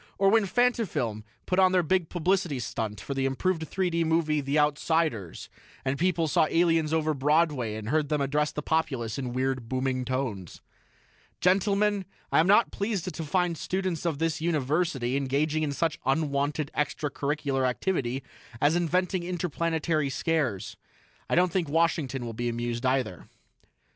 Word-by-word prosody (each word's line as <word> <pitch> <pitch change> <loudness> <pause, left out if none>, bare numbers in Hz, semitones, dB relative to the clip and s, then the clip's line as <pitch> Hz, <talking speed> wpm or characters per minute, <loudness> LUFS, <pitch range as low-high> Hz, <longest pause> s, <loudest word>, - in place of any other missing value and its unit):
Or 195 0 +4
when 220 -2 +4
Fantafilm 190 - 0 0.2
put 185 - +1
on 185 -1 +5
their 180 -1 +4
big 175 0 +1
publicity 175 -3 0
stunt 110 -2 -4
for 140 - -5
the 135 0 0
improved 160 +4 -1
3 185 -2 -1
D 165 0 +1
movie, 160 -2 +1
'The 140 +2 -1
Outsiders', 150 - 0 0.4
and 135 +1 -1
people 170 -2 +1
saw 155 - +3
the - - -2
aliens 165 -3 +3
over 155 -1 +1
Broadway 145 -5 +1
and 110 0 -5
heard 150 0 +1
them 150 - +1
address 150 +2 +1
the 150 - -5
populace 140 -8 -1
in 125 -2 -3
weird, 130 -2 -2
booming 130 0 -1
tones. 125 - -3 0.8
"Gentlemen, 200 +2 +2 0.3
I - - +4
am 165 - +4
not 210 +4 +5
pleased 200 -4 -2
to 165 - -5
find 175 +2 0
students 185 -1 -2
of 165 -4 -1
this 165 0 -1
University 150 -5 0
engaging 140 +3 0
in 150 -2 0
such 160 +2 -1
unwanted 145 +1 0
extra 150 0 -1
curricular 140 -2 0
activity 130 -3 -2 0.4
as 145 +5 +3
inventing 180 +2 +1
interplanetary 165 -3 -1
scares. 125 - -1 0.5
I - - +2
don't 180 0 +3
think 175 -4 -1
Washington 145 -5 0
will 115 - -5
be 120 +2 -2
amused, 120 +1 -2
either." 125 -9 -1
155 Hz, 160 wpm, -27 LUFS, 135-170 Hz, 0.8 s, on